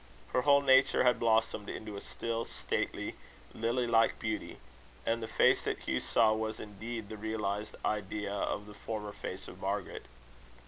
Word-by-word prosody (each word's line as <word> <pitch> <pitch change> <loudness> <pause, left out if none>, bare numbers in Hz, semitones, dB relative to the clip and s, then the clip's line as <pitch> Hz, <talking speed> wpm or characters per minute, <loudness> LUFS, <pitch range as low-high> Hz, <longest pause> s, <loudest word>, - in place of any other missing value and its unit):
Her 125 - +4
whole 140 +1 +5
nature 130 0 +5
had 125 -1 +4
blossomed 110 -2 +2
into 105 -1 -6
a 100 - -5
still, 115 0 -3
stately, - - -2 0.4
lily 120 +2 0
like 115 -1 +4
beauty; 110 -1 -3 0.5
and 115 0 +1
the 110 - -3
face - - +4
that - - -2
Hugh - - 0
saw 110 -2 +4
was 110 0 -2
indeed 110 +2 -6
the 110 - -7
realised 105 -1 -2
idea 105 -1 -1
of 100 0 -2
the 105 - -11
former 105 -1 -5
face - - -6
of - - -10
Margaret. - - -3
110 Hz, 165 wpm, -32 LUFS, 105-115 Hz, 0.5 s, whole